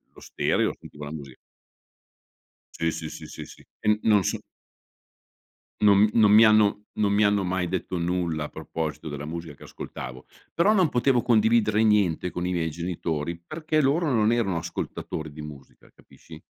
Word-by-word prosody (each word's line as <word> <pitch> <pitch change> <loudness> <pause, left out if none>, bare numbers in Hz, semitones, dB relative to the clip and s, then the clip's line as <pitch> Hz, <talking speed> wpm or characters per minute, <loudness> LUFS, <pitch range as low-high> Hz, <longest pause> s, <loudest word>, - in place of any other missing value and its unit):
lo - - -14
stereo - - 0
e - - -13
sentivo 75 0 -11
la 75 - -6
musi 70 -4 -9 1.4
Sì, 85 0 0
sì, 80 -1 -6
sì, - - -9
sì, - - -9
sì. - - -15
E 105 0 +2
non 105 -3 +4
so - - -1 1.4
non 100 -2 +6
mi 105 +2 +5
non 105 -3 +5
mi 110 +2 +8
hanno 105 -2 +4 0.2
non 100 -1 +2
mi 105 +1 +3
hanno 100 -2 +2
mai 90 -1 -1
detto 95 0 -3
nulla 85 -3 -1
a - - -8
proposito 80 -2 -5
della 70 -1 -6
musica 80 -1 -6
che - - -16
ascoltavo, 65 0 -8 0.3
però 195 +6 +3
non 185 -6 +3
potevo 125 -1 +2
condividere 110 -2 +3
niente 100 -5 +2
con 90 - -4
i 90 - -1
miei 85 -2 -1
genitori 85 -1 -3
perché 155 - -2
loro 150 +2 +2
non 110 -2 +3
erano 100 -7 0
ascoltatori 80 -1 -5
di 75 - -9
musica, 75 -3 -12
capisci? - - -15
95 Hz, 175 wpm, -25 LUFS, 80-110 Hz, 1.4 s, mi